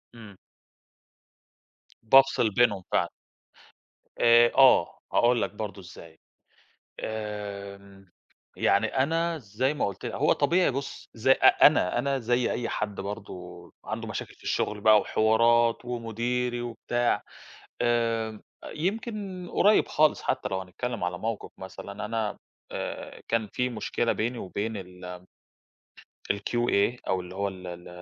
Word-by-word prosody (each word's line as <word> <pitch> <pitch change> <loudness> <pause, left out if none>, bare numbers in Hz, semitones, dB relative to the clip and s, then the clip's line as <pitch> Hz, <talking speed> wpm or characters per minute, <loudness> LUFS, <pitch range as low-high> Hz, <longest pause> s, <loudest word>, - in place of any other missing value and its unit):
إمم. 105 -4 -12 1.7
بافصل 135 -1 +5
بينهم 105 -3 +2
فعلًا. - - +2 1.1
آآ، 120 0 +6
آه 130 -10 +5
هاقول 120 0 +3
لك - - -1
برضو 105 -2 -6
إزاي، 85 -2 -13 0.8
آمم، 100 -2 -6 0.5
يعني - - +3
أنا 165 +5 0
زي 125 +4 -1
ما - - -1
قلت 100 -2 -5
ل - - -3
هو - - +3
طبيعي، 175 -4 +2
بُصّ، 140 +1 -6
زي 125 +4 +2
أ - - +7
أنا، 90 - +1
أنا 135 +1 0
زي 120 +1 +1
أي 120 - -2
حد 105 -2 -3
برضو 90 -4 -8
عنده - - -4
مشاكل - - -5
في - - -22
الشغل 105 -1 -1
بقى 110 -1 +7
وحوارات 115 +2 +3
ومديري 120 +1 -2
وبتاع، 120 0 -1 0.6
آآ، 115 -2 0 0.3
يمكن 195 0 -3
قريّب 210 +2 +4
خالص 155 0 +2
حتى - - -1
لو 95 - -1
هنتكلم 110 +4 -5
على 90 0 -2
موقف 115 0 -4
مثلًا 100 +2 -7
أنا 110 -1 -2 0.3
آآ، - - -6
كان 115 -2 0
في 125 +4 -1
مشكلة 120 0 -1
بيني 120 +3 -2
وبين 105 +3 -4
ال 90 -1 -9 1.1
الQA 120 +2 0
أو 95 -1 0
اللي 90 +1 -10
هو 100 +1 -1
ال 95 -2 -8
ال 85 0 -8
115 Hz, 130 wpm, -27 LUFS, 100-125 Hz, 1.7 s, أ